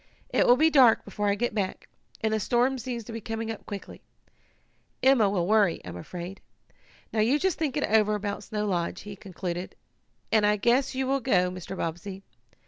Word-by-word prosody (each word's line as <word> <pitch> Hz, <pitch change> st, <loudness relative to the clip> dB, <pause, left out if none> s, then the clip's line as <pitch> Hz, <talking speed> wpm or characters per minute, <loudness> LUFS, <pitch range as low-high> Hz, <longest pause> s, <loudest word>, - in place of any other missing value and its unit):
"It -, -, +2 dB
will 245 Hz, -, +8 dB
be 320 Hz, +3 st, +4 dB
dark 255 Hz, -6 st, +6 dB
before 205 Hz, 0 st, -3 dB
I 200 Hz, -, +2 dB
get 240 Hz, +2 st, -1 dB
back, 200 Hz, -3 st, -3 dB, 0.3 s
and 220 Hz, 0 st, 0 dB
the 220 Hz, -, +1 dB
storm 245 Hz, +5 st, +1 dB
seems 240 Hz, -1 st, -4 dB
to 225 Hz, -, -9 dB
be 225 Hz, -, -5 dB
coming 225 Hz, +1 st, -4 dB
up 220 Hz, -, -9 dB
quickly. 200 Hz, -2 st, -8 dB, 1.0 s
Emma 260 Hz, -6 st, +5 dB
will 185 Hz, -3 st, 0 dB
worry, 205 Hz, -3 st, +3 dB
I'm 90 Hz, -1 st, -7 dB
afraid. 175 Hz, -, -7 dB, 0.7 s
Now 220 Hz, -, 0 dB
you 235 Hz, +7 st, +3 dB
just 375 Hz, +2 st, 0 dB
think 300 Hz, -4 st, -1 dB
it 290 Hz, -, 0 dB
over 215 Hz, -1 st, +3 dB
about 205 Hz, 0 st, -4 dB
Snow 210 Hz, -1 st, -2 dB
Lodge," 180 Hz, -1 st, -2 dB
he 205 Hz, 0 st, -8 dB
concluded, 180 Hz, -2 st, -6 dB, 0.6 s
"and 220 Hz, -1 st, +4 dB
I 210 Hz, 0 st, +4 dB
guess 245 Hz, +6 st, +2 dB
you 265 Hz, 0 st, 0 dB
will 275 Hz, +1 st, +1 dB
go, 180 Hz, -8 st, +2 dB
Mr. 185 Hz, +1 st, -7 dB
Bobbsey. 190 Hz, +4 st, -5 dB
215 Hz, 195 wpm, -27 LUFS, 195-240 Hz, 1.0 s, will